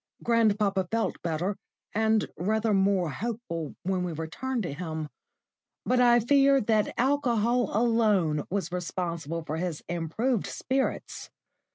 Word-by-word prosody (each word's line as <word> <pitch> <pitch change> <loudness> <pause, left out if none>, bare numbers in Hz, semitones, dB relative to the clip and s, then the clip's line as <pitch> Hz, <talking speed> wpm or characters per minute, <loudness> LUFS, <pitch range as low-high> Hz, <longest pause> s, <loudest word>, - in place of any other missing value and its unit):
Grandpapa 210 -5 +2
felt 225 0 -1
better, 175 +4 -2 0.4
and 220 0 +2
rather 215 +4 0
more 190 -4 +2
hopeful 180 - -4
when 185 0 0
we 175 -2 -3
returned 220 +11 -3
to 170 - -4
him; 160 -1 -5 0.8
but 250 0 +2
I 240 -1 +6
fear 275 +3 +4
that 215 -2 +1
alcohol 245 -3 +2
alone 210 -10 +2
was 190 -2 -2
responsible 170 -2 -3
for 155 0 -4
his 170 -2 -3
improved 175 +8 -1
spirits. 265 +1 -2
200 Hz, 125 wpm, -28 LUFS, 170-235 Hz, 0.8 s, I